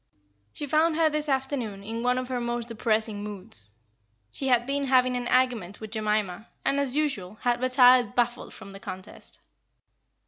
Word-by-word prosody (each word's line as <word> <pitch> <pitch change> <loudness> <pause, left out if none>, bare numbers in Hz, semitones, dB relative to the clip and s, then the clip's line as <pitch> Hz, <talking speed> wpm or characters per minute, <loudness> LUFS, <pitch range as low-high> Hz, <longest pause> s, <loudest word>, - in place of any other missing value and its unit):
She 295 - -5
found 310 +3 +2
her 320 -1 +3
this 300 0 -1
afternoon 260 -7 -2
in 225 +3 -4
one 250 +1 +2
of 255 0 -2
her 250 -1 -2
most 240 0 -2
depressing 220 -2 -1
moods. 205 - -6 0.6
She 270 - -3
had 245 -2 +3
been 280 +1 -1
having 255 -1 +3
an 245 -1 -2
argument 240 -7 +1
with 220 -1 -8
Jemima, 215 -2 -1 0.2
and, 280 - +2
as 275 -2 0
usual, 245 -11 -1
had 240 0 +1
retired 255 -3 +5
baffled 245 0 0
from 195 - -11
the 195 - -10
contest. 185 0 -9
245 Hz, 170 wpm, -27 LUFS, 215-260 Hz, 0.6 s, retired